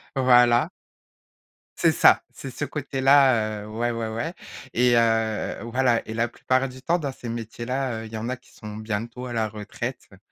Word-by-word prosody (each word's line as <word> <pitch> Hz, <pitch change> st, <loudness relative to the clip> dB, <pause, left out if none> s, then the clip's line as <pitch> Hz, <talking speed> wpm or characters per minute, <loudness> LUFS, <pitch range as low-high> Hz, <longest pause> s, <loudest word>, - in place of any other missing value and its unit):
Voilà. 125 Hz, -2 st, +5 dB, 1.1 s
C'est -, -, +4 dB
ça. -, -, +5 dB
C'est 135 Hz, -, -8 dB
ce 145 Hz, -, -5 dB
côté-là, 135 Hz, -6 st, +2 dB
heu, -, -, -10 dB
ouais, 115 Hz, +3 st, -1 dB
ouais, 115 Hz, -1 st, -3 dB
ouais 115 Hz, +10 st, -3 dB, 0.4 s
et, 125 Hz, +1 st, +3 dB
heu 115 Hz, -2 st, +1 dB
voilà 120 Hz, 0 st, +1 dB
et 110 Hz, -, -5 dB
la 115 Hz, +1 st, 0 dB
plupart 130 Hz, +3 st, 0 dB
du 130 Hz, 0 st, -12 dB
temps 170 Hz, +4 st, +1 dB
dans 145 Hz, -4 st, -3 dB
ces 125 Hz, -, -10 dB
métiers-là, 115 Hz, +1 st, -3 dB
heu, -, -, -8 dB
il 110 Hz, -, -11 dB
y -, -, -3 dB
en 115 Hz, +2 st, -4 dB
a 130 Hz, -, -2 dB
qui -, -, -24 dB
sont 105 Hz, -1 st, -9 dB
bientôt 115 Hz, +3 st, -4 dB
à 125 Hz, -, -5 dB
la 110 Hz, -2 st, 0 dB
retraite, 110 Hz, +4 st, -5 dB
heu, -, -, -15 dB
120 Hz, 190 wpm, -24 LUFS, 110-130 Hz, 1.1 s, Voilà